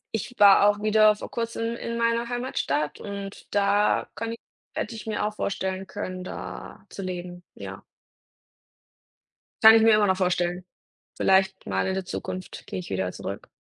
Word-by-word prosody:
Ich 235 Hz, +3 st, -5 dB
war 205 Hz, 0 st, +7 dB
auch 205 Hz, 0 st, 0 dB
wieder 215 Hz, 0 st, +5 dB
vor -, -, -9 dB
kurzem 230 Hz, 0 st, -2 dB
in 235 Hz, 0 st, -4 dB
meiner 235 Hz, 0 st, +1 dB
Heimatstadt 195 Hz, -, -2 dB
und 200 Hz, -1 st, -7 dB
da 205 Hz, +1 st, +2 dB
kann 230 Hz, 0 st, -4 dB
ich 230 Hz, -, -5 dB, 0.4 s
hätte 235 Hz, -, -3 dB
ich 225 Hz, -, -9 dB
mir 210 Hz, -1 st, -1 dB
auch 210 Hz, -, -2 dB
vorstellen 190 Hz, -2 st, -3 dB
können, 185 Hz, -2 st, -5 dB
da -, -, -8 dB
zu -, -, -7 dB
leben, 180 Hz, -1 st, -6 dB
ja. -, -, -8 dB, 1.8 s
Kann 220 Hz, 0 st, +11 dB
ich 225 Hz, -, +6 dB
mir 225 Hz, -1 st, +6 dB
immer 210 Hz, -1 st, +3 dB
noch 190 Hz, -1 st, +2 dB
vorstellen. 180 Hz, -1 st, 0 dB, 0.5 s
Vielleicht 190 Hz, 0 st, +2 dB
mal 95 Hz, -1 st, 0 dB
in -, -, 0 dB
der 190 Hz, -1 st, -3 dB
Zukunft 185 Hz, 0 st, -6 dB
gehe -, -, -5 dB
ich 180 Hz, -2 st, -7 dB
wieder 95 Hz, -1 st, -2 dB
zurück. -, -, -7 dB
200 Hz, 165 wpm, -26 LUFS, 185-220 Hz, 1.8 s, Kann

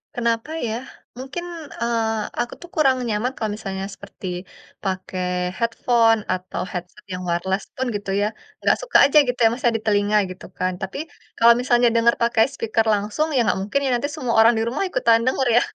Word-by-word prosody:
Kenapa 235 Hz, +4 st, -1 dB, 0.2 s
ya? 220 Hz, -, -2 dB, 0.4 s
Mungkin, 275 Hz, +7 st, -6 dB, 0.4 s
eee, 230 Hz, -1 st, +1 dB, 0.3 s
aku 240 Hz, -, -4 dB
tuh 350 Hz, -, -11 dB
kurang 270 Hz, -4 st, +4 dB
nyaman 220 Hz, +4 st, 0 dB
kalau 215 Hz, -2 st, -2 dB
misalnya 195 Hz, -2 st, -5 dB
seperti 200 Hz, -1 st, -12 dB, 0.6 s
pakai 185 Hz, -1 st, -3 dB, 0.3 s
headphone, 230 Hz, -1 st, +2 dB
atau 185 Hz, -1 st, -4 dB
headset 180 Hz, +3 st, -7 dB
yang 180 Hz, -, -4 dB
wireless 190 Hz, +3 st, -1 dB
pun 260 Hz, -, -2 dB
gitu 200 Hz, -1 st, -5 dB
ya. -, -, +2 dB, 0.4 s
Nggak -, -, +3 dB
suka -, -, +3 dB
aja 280 Hz, +2 st, +3 dB
gitu 245 Hz, 0 st, -2 dB
ya, -, -, +8 dB
Mas, 250 Hz, -, -7 dB
ya, 240 Hz, -, +5 dB
di -, -, -10 dB
telinga 205 Hz, 0 st, +2 dB
gitu 185 Hz, -, -10 dB
kan. 185 Hz, 0 st, 0 dB
Tapi, 190 Hz, +6 st, -5 dB, 0.4 s
kalau 235 Hz, +1 st, +7 dB
misalnya 245 Hz, -1 st, +3 dB
dengar 235 Hz, +1 st, +4 dB
pakai 235 Hz, -1 st, +4 dB
speaker 225 Hz, -2 st, 0 dB
langsung, 210 Hz, +10 st, 0 dB
ya -, -, +4 dB
nggak 190 Hz, -, +1 dB
mungkin 210 Hz, +8 st, 0 dB
ya, -, -, +1 dB
nanti 285 Hz, +4 st, -1 dB
semua 240 Hz, -3 st, -2 dB
orang 230 Hz, +2 st, +6 dB
di 225 Hz, -, +1 dB
rumah 265 Hz, +10 st, -1 dB
ikutan 230 Hz, -8 st, +3 dB
dengar 260 Hz, 0 st, +1 dB
ya. -, -, +6 dB
230 Hz, 190 wpm, -22 LUFS, 205-245 Hz, 0.6 s, ya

